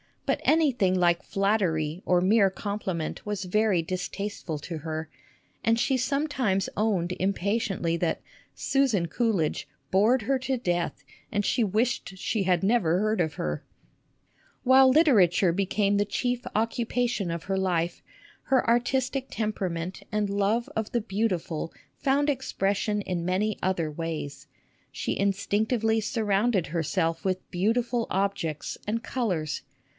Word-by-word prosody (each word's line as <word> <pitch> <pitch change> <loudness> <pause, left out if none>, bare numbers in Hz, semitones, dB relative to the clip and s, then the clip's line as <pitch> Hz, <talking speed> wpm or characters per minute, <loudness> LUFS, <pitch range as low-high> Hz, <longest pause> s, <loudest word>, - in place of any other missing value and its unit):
But - - +1
anything 265 - +3
like 175 -1 +3
flattery 185 -6 0
or 180 -1 +3
mere 200 +1 +4
compliment 190 -4 -4
was 205 -2 -3
very 190 -1 +2
distasteful 185 -1 -4
to 160 +2 -6
her, 160 0 -4 0.5
and 225 0 +3
she 265 +3 +2
sometimes 255 -7 0
owned 195 -5 +1
impatiently 195 -2 0
that 170 -1 -1 0.2
" - - -38
Susan 260 -11 +1
Coolidge 205 -7 0
" 135 +1 -44
bored 220 +6 +4
her 265 +4 +1
to 260 0 -1
death, 175 -7 -2 0.3
and 205 -1 0
she 245 - +2
wished 215 -2 -1
she 205 +2 -1
had 180 -1 +2
never 190 -6 +3
heard 215 +2 +1
of 160 -2 0
her! 75 -1 -3 1.0
While 260 +1 +7
literature 205 - +5
became 200 +2 +1
the 205 - +2
chief 245 +4 -2
occupation 230 -2 0
of 170 -1 -3
her 195 0 -1
life, 175 -3 0 0.4
her 265 -1 +2
artistic 255 +3 +1
temperament 185 -5 -3
and 210 -1 0
love 205 +4 +1
of 220 -1 -2
the 240 - +2
beauti 205 -3 0
ful 165 0 -5 0.2
found 280 +1 +2
expression 210 -5 0
in 180 -3 -3
many 195 +4 0
other 175 -4 0
ways. 155 -2 -5 0.4
She - - -3
in 200 0 +2
stinctively 220 +3 +1
surrounded 210 -2 +1
herself 165 0 -1
with 185 -1 -2
beautiful 230 +5 0
objects 190 -6 -2
and 230 +2 -1
colors. 180 - -2
200 Hz, 140 wpm, -27 LUFS, 175-230 Hz, 1.0 s, While